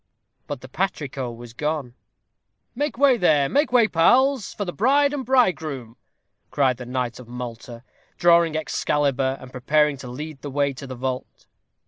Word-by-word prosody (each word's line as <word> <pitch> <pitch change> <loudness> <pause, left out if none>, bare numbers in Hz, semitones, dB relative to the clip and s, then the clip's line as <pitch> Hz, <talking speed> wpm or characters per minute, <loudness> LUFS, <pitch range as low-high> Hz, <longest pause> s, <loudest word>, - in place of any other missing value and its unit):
But 145 -3 -5
the 130 - -10
patrico 140 -6 -3
was 120 0 -11
gone. 150 -2 -3 0.8
"Make 290 +1 -2
way 270 -2 +5
there 155 -8 +3
make 290 - +1
way, 240 -3 +5
pals, 255 +8 +3
for 205 - -4
the 175 - -5
bride 280 +6 +3
and 280 -2 -3
bridegroom," 160 - 0 0.5
cried 130 -4 +1
the 125 - -8
knight 125 -2 -3
of 125 - -12
Malta, 120 0 -8 0.3
drawing 170 -2 +4
Excalibur, 140 -3 0
and 130 - -12
preparing 150 +3 +2
to 130 - -9
lead 145 +3 -7
the 145 - -6
way 140 0 0
to 135 +1 -9
the 130 - -6
vault. 130 +1 -5
145 Hz, 160 wpm, -23 LUFS, 125-185 Hz, 0.8 s, way